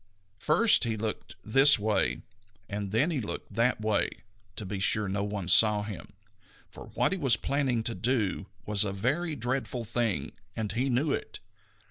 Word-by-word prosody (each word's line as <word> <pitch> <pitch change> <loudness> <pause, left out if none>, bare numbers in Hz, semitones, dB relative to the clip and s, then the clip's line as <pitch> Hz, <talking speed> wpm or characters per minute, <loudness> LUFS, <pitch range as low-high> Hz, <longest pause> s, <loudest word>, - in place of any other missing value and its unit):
First 205 - +4
he 115 -2 -1
looked 110 0 -5
this 135 +7 +6
way, 100 - -1 0.4
and 100 -1 -5
then 130 +11 +2
he 145 -6 -1
looked 105 - -7
that 115 +3 +1
way, 110 -1 +1 0.5
to 105 - -6
be 95 +1 -5
sure 105 +2 +1
that 95 - -3
no 100 0 -1
one 100 -3 -4
saw 105 +3 +5
him, 100 -6 -8 0.6
for - - -11
what - - +1
he 190 - -2
was 130 -7 +3
planning 135 -5 -1
to 115 - -1
do 110 -5 -1 0.2
was 105 -1 +2
a 100 -2 -3
very 145 - -1
dreadful 125 -1 -3
thing, 110 - -2 0.2
and 110 -2 -3
he 125 +5 -1
knew 135 +4 +1
it. - - -4
110 Hz, 175 wpm, -28 LUFS, 105-130 Hz, 0.6 s, this